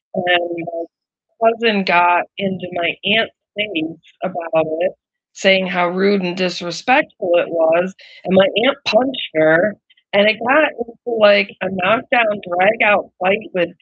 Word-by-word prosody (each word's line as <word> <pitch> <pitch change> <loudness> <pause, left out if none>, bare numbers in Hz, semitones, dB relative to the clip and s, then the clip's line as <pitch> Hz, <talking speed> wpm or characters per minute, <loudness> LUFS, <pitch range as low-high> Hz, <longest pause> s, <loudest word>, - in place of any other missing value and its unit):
and 190 - -4
my 170 -1 -1 0.7
cousin 230 -3 0
got 175 0 +3
into 190 -2 -5
my 170 -2 -1
aunt's 220 +3 +2 0.2
face 165 -6 -5 0.2
about 165 -3 -2
it, 185 - -1 0.4
saying 190 -2 +3
how 180 -1 0
rude 195 +2 0
and 175 0 -4
disrespectful 185 - -1
it - - +1
was, 170 +3 0 0.3
and 180 - -2
my 190 +1 +6 0.2
aunt 275 - +2
punched 255 +5 0
her, 160 +6 +3 0.4
and 200 +1 +4
it 215 - +3
got 295 +3 +4
into 235 -1 -8
like 205 0 +5
a 190 - -3
knock-down, 210 +3 +1
drag-out 205 +3 +2
fight 190 +3 +1 0.2
with 170 -2 0
190 Hz, 140 wpm, -17 LUFS, 175-210 Hz, 0.7 s, my